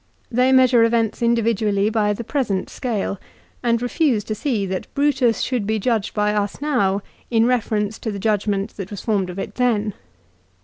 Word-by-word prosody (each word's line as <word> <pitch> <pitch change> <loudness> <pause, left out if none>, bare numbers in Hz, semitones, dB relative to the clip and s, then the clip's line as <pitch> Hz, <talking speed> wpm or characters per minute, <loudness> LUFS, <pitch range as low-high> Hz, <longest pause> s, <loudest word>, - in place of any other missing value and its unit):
They 250 +2 +3
measure 255 -3 +5
events 230 -1 +1
individually 220 -3 +2
by 210 -2 +1
the 235 - -5
present 220 -7 -2
scale, 215 -6 -2 0.4
and 235 -1 +2
refuse 245 -4 +1
to 215 - -3
see 215 -3 -1
that 185 -1 -4
Brutus 265 -6 +2
should 245 -6 -1
be 220 0 +1
judged 220 -1 -1
by 210 0 +1
us 205 -1 -1
now 205 -10 +1 0.3
in 225 -1 +3
reference 220 -4 0
to 220 - -3
the 200 - -5
judgment 205 -1 -1
that 195 -2 -5
was 205 - -6
formed 200 -5 0
of 180 - -7
it - - -5
then. 220 -4 +1
220 Hz, 175 wpm, -21 LUFS, 205-245 Hz, 0.4 s, measure